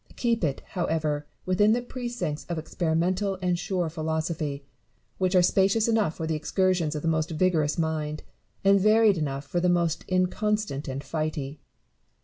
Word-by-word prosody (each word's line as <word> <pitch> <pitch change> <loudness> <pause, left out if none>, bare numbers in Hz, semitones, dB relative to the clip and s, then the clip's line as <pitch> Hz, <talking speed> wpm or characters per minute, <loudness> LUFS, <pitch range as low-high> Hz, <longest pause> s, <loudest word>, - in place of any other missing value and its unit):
Keep 230 -4 0
it, 140 -4 0
however, 155 -4 -1 0.2
within 205 +4 +4
the 240 - +1
precincts 240 - -4
of 170 - -2
experimental 175 +5 0
and 180 -2 0
sure 180 -2 -1
philosophy, 155 -2 -3 0.5
which 185 0 +1
are 180 - +6
spacious 195 +5 +3
enough 220 -8 +1
for 160 - -4
the 160 - -1
excursions 170 0 +1
of 150 - -4
the - - -1
most 160 -1 +1
vigorous 160 -2 +1
mind, 155 -2 -2 0.4
and 195 0 +5
varied 215 -2 +5
enough 140 -2 -3
for 175 +5 -1
the 180 +1 +2
most 170 -2 +1
inconstant 185 -4 0
and 135 +1 -4
flighty. 150 -1 -3
170 Hz, 155 wpm, -26 LUFS, 155-190 Hz, 0.5 s, are